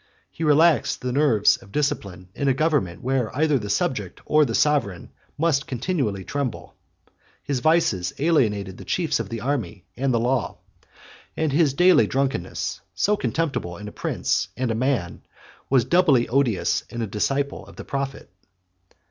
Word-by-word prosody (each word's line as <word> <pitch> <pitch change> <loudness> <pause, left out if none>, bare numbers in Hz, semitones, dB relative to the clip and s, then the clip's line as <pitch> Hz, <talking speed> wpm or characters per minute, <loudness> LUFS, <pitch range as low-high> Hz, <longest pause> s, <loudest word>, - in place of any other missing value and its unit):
He 165 - -6
relaxed 155 +1 +3
the 125 - -2
nerves 125 -8 +4
of 100 - -17
discipline, 100 -11 -2
in 140 - -2
a 135 - +3
government 135 - 0
where 130 -3 0
either 150 -3 +2
the 105 -2 -6
subject 125 - -1
or 150 0 +4
the 115 -4 -2
sovereign 135 - 0 0.3
must 150 -3 +1
continually 125 - -2
tremble: 140 +2 -4 0.7
his 140 -3 -2
vices 120 - +2
alienated 105 - +1
the - - -8
chiefs 170 -8 0
of 110 -4 -4
the 115 -1 -5
army 120 -8 -3
and 135 +1 0
the 120 - +2
law; 125 +2 -1 0.8
and 160 -2 0
his 145 -3 +3
daily 180 +4 +5
drunkenness, 135 -10 -2
so 210 - +2
contemptible 135 - -2
in 105 - -8
a - - -7
prince - - -1
and 125 -2 -1
a - - +1
man, 120 -6 -1 0.5
was 130 -3 +3
doubly 155 -9 +3
odious 125 -5 +1
in 120 -1 -4
a - - 0
disciple 135 +8 -2
of - - -14
the - - -9
prophet. 135 0 -4
135 Hz, 160 wpm, -23 LUFS, 110-150 Hz, 0.8 s, daily